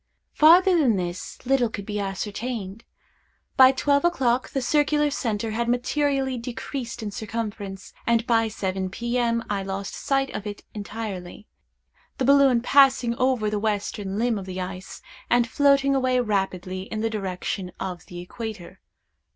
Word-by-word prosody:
Farther 355 +4 +6
than 270 -10 +3
this, 180 +3 -5
little 250 -2 +2
could 200 -2 -6
be 210 0 -3
ascertained. 205 +2 -4 0.7
By 260 0 +8
twelve 280 +2 +1
o'clock 260 -8 +1
the 270 - -2
circular 295 +3 +2
centre 225 -4 -2
had 235 +2 -1
materially 265 +1 0
decreased 240 0 -5
in 210 - -4
circumference, 205 -2 -5
and 235 0 +2
by 225 -1 +3
seven 190 -3 -3
P.M. 235 +2 -1
I 200 -1 -1
lost 195 +1 -5
sight 270 -1 0
of 210 - -5
it 205 0 -7
entirely; 205 -3 -6 0.7
the 260 - 0
balloon 275 -3 +5
passing 265 -2 +4
over 255 -4 +1
the 210 - -1
western 205 -2 -2
limb 230 -1 +1
of 190 - -9
the 185 0 -5
ice, 185 +1 -7 0.3
and 240 -1 +3
floating 275 +1 +3
away 255 -1 +2
rapidly 190 -4 -2
in 215 - -2
the 225 - 0
direction 190 -2 -3
of 185 -2 -5
the 175 - -8
equator. 195 -1 -8
225 Hz, 150 wpm, -24 LUFS, 195-260 Hz, 0.7 s, By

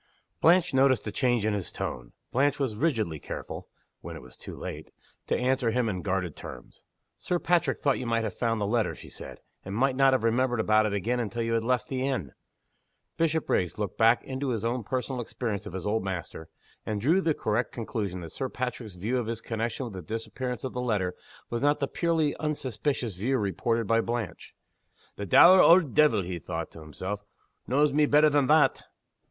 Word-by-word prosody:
Blanche 170 -1 +4
noticed 130 -1 +3
a 105 - -3
change 120 -2 +1
in 110 - +1
his 100 -5 -3
tone. - - -5 0.2
Blanche 140 +3 +2
was 135 -6 -1
rigidly 110 - 0
careful - - -7 0.3
(when - - -8
it - - -9
was 65 - -13
too - - -9
late) - - -7 0.4
to - - +1
answer 125 -1 +1
him 120 +1 +1
in 95 -4 -2
guarded 90 -5 -2
terms. - - -10 0.4
"Sir 180 - -1
Patrick 175 0 +1
thought 140 -2 +1
you 125 - -4
might 115 -1 +1
have 110 -4 -3
found 115 +1 -1
the 105 - 0
letter," 110 +1 0
she - - -12
said, - - -10 0.2
"and 95 +1 -6
might 130 +3 +2
not 135 0 +5
have 130 - +1
remembered 120 +1 +1
about 110 0 +3
it 105 - -3
again 115 +5 0
until 120 0 -2
after - - -1
you 115 - -1
had 115 -1 +1
left 125 +3 0
the 130 -4 -2
inn." 130 - -2 0.9
Bishopriggs 155 - 0
looked 105 -3 -4
back 115 +1 +5
into 135 +1 -3
his 115 -3 -2
own 120 +1 -1
personal 130 +2 -2
experience 110 -3 -4
of - - -8
his 95 -1 -5
old 105 0 0
master 90 -4 -5 0.3
and 105 -1 -3
drew 160 - +3
the 160 -4 +1
correct 110 +3 -1
conclusion 105 -6 -4
that 85 -2 -8
Sir 130 - -3
Patrick's 125 -5 -4
view 110 +8 -1
of 120 - -3
his 115 -1 -3
connection 115 +3 -3
with 115 - -7
the 95 - -6
disappearance 115 +6 -5
of 130 - -4
the 125 - -3
letter 105 -7 0 0.4
was 120 - -2
not 145 +1 +3
the 140 - 0
purely 160 0 0
unsuspicious 130 - -2
view 125 +9 0
reported 115 +3 0
by 115 +2 +3
Blanche. 115 -8 -4 0.6
"The 100 - -5
dour 185 - +8
auld 170 -6 +6
deevil," 120 -10 +4
he 90 -1 -4
thought 85 -1 -5
to - - -12
himself, 95 +7 -6 0.4
"knows 145 +3 +3
me 150 0 +4
better 150 +1 +5
than 145 -2 +3
_that! 155 0 +4
115 Hz, 205 wpm, -28 LUFS, 105-135 Hz, 0.9 s, dour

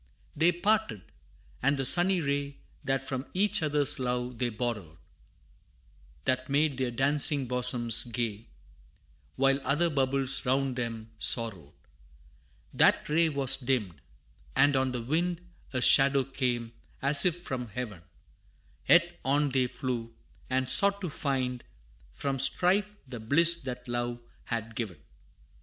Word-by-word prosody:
They 165 +4 +3
parted, 205 - -1 0.6
and 140 +2 +2
the 135 - -1
sunny 180 +5 +4
ray 140 -1 -3 0.3
That 135 -1 -1
from 130 0 -4
each 210 +2 +2
other's 145 -2 +1
love 125 -1 -3
they 125 -1 0
borrowed; 105 -8 -5 1.3
That 130 +1 -1
made 145 -1 +1
their 130 -2 0
dancing 140 +3 +1
bosoms 125 -2 +1
gay, 115 -2 -4 0.9
While 135 +1 +2
other 165 +4 +1
bubbles 135 -1 -1
round 135 0 0
them 115 -2 -5
sorrowed: 100 - 0 1.0
That - - +3
ray 165 +2 +2
was 140 -3 0
dimmed, 120 - -2 0.5
and 145 0 +4
on 130 0 0
the 125 -2 -4
wind 170 +6 -2 0.2
A 130 -2 -2
shadow 135 +1 +6
came, 125 -3 -3 0.3
as 140 +1 +6
if 175 -1 0
from 125 -6 -5
Heaven; 105 -5 -7 0.9
Yet 175 0 +4
on 145 +2 +1
they 130 -1 +1
flew, 125 -2 -5 0.3
and 130 0 0
sought 200 +9 +5
to 180 -5 -4
find 130 -4 -2 0.5
From 135 -1 -3
strife, 190 +9 +2
the 125 -3 -8
bliss 155 +10 +3
that 125 -2 -7
love 120 0 -3 0.3
had 115 -1 -4
given. 110 -8 -5
130 Hz, 130 wpm, -28 LUFS, 120-145 Hz, 1.3 s, shadow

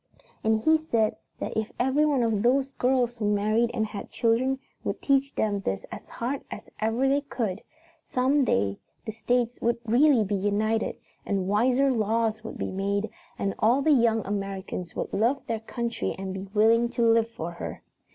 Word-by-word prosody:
"And 220 0 +3
he 315 +8 +4
said 230 -9 +1 0.2
that - - -5
if 220 0 -2
every 265 +4 +3
one 280 -5 +2
of 220 -3 +1
those 265 +4 +2
girls 250 -2 +1
who 210 -2 0
married 215 +3 +2
and 225 -3 0
had 210 -2 -7
children 245 +3 +1 0.3
would - - -3
teach 275 0 +1
them 205 -2 0
this 95 - -3
as - - -9
hard 260 +4 -3
as - - -8
ever 225 +5 +1
they 280 +1 +2
could, 220 -8 -3 0.4
some 270 +3 +2
day 100 - +1 0.3
the 220 - -3
states 240 +2 -1
would 235 +1 +1
really 245 +1 +4
be 205 0 -3
united, 205 +3 0 0.3
and 195 -2 -1
wiser 250 +7 +3
laws 220 -1 0
would 225 - -7
be - - -3
made, 200 +2 -1 0.3
and 195 -1 -1
all 245 +6 +3
the 315 - +4
young 230 -5 +3
Americans 195 -3 -4
would - - -4
love 235 +7 +1
their 225 -1 -2
country 235 +1 -3
and 190 0 -5
be 190 +1 -6
willing 225 +3 +4
to 235 0 -1
live 230 0 +4
for 170 -7 -6
her. 170 - -7
225 Hz, 180 wpm, -26 LUFS, 205-250 Hz, 0.4 s, he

